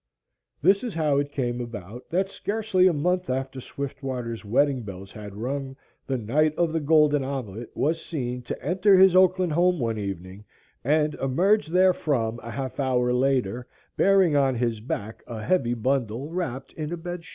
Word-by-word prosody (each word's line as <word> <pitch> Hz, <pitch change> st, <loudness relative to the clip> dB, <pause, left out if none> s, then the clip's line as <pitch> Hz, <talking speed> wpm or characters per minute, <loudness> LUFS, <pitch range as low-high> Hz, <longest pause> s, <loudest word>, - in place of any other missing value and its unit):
This 195 Hz, +6 st, +4 dB
is 235 Hz, -7 st, -4 dB
how 150 Hz, -4 st, +2 dB
it 145 Hz, 0 st, -2 dB
came 125 Hz, -3 st, -2 dB
about 115 Hz, 0 st, -8 dB
that 190 Hz, +3 st, +1 dB
scarcely 200 Hz, -2 st, +1 dB
a -, -, +4 dB
month 180 Hz, +3 st, 0 dB
after 130 Hz, 0 st, -3 dB
Swiftwater's 130 Hz, -4 st, -5 dB
wedding 130 Hz, +5 st, +2 dB
bells 100 Hz, -2 st, -9 dB
had 105 Hz, -2 st, -9 dB
rung, 135 Hz, +4 st, -4 dB, 0.3 s
the 135 Hz, -, 0 dB
"Knight 150 Hz, +7 st, +1 dB
of 170 Hz, -2 st, +1 dB
the 165 Hz, -, +1 dB
Golden 150 Hz, -2 st, +4 dB
Omelette" 120 Hz, -5 st, -5 dB
was 160 Hz, +3 st, 0 dB
seen 125 Hz, -6 st, -4 dB
to 120 Hz, -, -7 dB
enter 190 Hz, +4 st, +4 dB
his 190 Hz, -1 st, +6 dB
Oakland 185 Hz, -1 st, +4 dB
home 180 Hz, +2 st, +3 dB
one 115 Hz, -5 st, -1 dB
evening 95 Hz, 0 st, -6 dB, 0.4 s
and 150 Hz, +3 st, +2 dB
emerge 180 Hz, +10 st, +2 dB
therefrom 155 Hz, -10 st, +2 dB
a 115 Hz, -, -8 dB
half 130 Hz, +4 st, -5 dB
hour 125 Hz, -2 st, +1 dB
later 125 Hz, -3 st, 0 dB, 0.3 s
bearing 190 Hz, -5 st, +4 dB
on 135 Hz, -2 st, +3 dB
his 115 Hz, -2 st, -1 dB
back 110 Hz, -1 st, -5 dB
a 115 Hz, -3 st, -6 dB
heavy 130 Hz, -9 st, +1 dB
bundle 125 Hz, +2 st, -1 dB
wrapped 135 Hz, -7 st, -4 dB
in 155 Hz, 0 st, -5 dB
a 175 Hz, -, -3 dB
bed 175 Hz, +1 st, -6 dB
sheet. -, -, -14 dB
135 Hz, 175 wpm, -25 LUFS, 120-170 Hz, 0.4 s, his